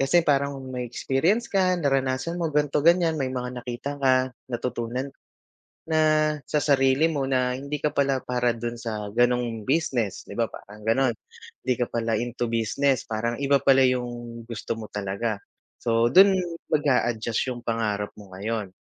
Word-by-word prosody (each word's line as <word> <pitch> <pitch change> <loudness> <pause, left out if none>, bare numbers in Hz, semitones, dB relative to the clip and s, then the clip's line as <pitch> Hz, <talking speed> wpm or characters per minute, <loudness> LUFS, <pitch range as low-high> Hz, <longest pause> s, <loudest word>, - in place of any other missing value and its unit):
Kasi 135 +6 +4
parang 140 -3 +1
may 125 -1 -4
experience 160 - 0
ka 190 -2 +2
naranasan 135 +3 0
mo 165 -3 -2
ganito, 150 0 +1
ganyan, 170 -1 +4
may 130 -3 -2
mga 125 -1 -3
nakita 125 +3 -4
ka, 135 -2 +4 0.3
natutunan 125 +1 -3 0.8
na 160 -1 +1 0.5
sa - - -1
sarili 135 0 +3
mo 140 -4 -1
na 130 -1 +1
hindi 140 +3 -4
ka 150 - +1
pala 140 -1 +2
para 125 -1 0
dun 120 0 -5
sa, 105 -3 -4
ganong, 120 -2 +1
business, 130 - 0
'di - - -11
ba - - +2
parang 105 +1 -12
ganon? 125 +1 +3 0.5
Hindi 130 - 0
ka 125 - +1
pala 115 -1 0
into 120 +1 -2
business 115 +4 +1
parang 115 +2 -2
iba 140 0 +4
pala 135 0 +5
yung 120 -2 -2
gusto 115 -3 -4
mo 110 -2 -6
talaga, 105 +2 -2 0.4
so, 115 0 +2
dun 195 +8 +7 0.4
mag-adjust 125 -5 +1
yung 120 - -8
pangarap 110 -3 -1
mo 100 -3 -13
ngayon. 105 0 -3
125 Hz, 160 wpm, -25 LUFS, 115-140 Hz, 0.8 s, dun